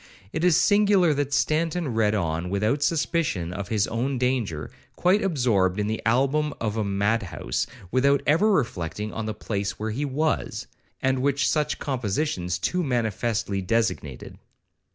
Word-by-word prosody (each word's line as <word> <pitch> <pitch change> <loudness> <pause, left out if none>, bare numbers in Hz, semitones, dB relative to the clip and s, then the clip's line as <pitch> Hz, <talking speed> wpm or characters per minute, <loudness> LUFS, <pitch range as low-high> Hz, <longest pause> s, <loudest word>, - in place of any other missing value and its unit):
It 160 - -2
is 180 -4 +5
singular 205 -5 +4
that 145 -1 -1
Stanton 160 -1 0
read 110 -1 +2
on 85 -2 -1
without 105 +9 0
suspicion 150 - 0
of 100 0 -5
his 105 -1 +1
own 125 +4 -2
danger, 120 - -1 0.2
quite 185 +4 +3
absorbed 115 - +1
in 105 - 0
the 110 +1 -2
album 140 +5 +2
of 110 -2 -2
a 110 - 0
mad 100 +3 +1
house, 90 - -3 0.2
without 140 +3 +3
ever 180 +9 +4
reflecting 105 - -1
on 110 -1 -4
the 110 - -3
place 100 -2 -3
where 110 +1 -3
he 130 +7 -2
was, 150 +3 -1 0.4
and 130 -1 +1
which 140 0 +1
such 150 -1 0
compositions 105 - -2
too 180 - -1
manifestly 115 - -1
designated. 95 - -2
120 Hz, 155 wpm, -25 LUFS, 100-150 Hz, 0.4 s, is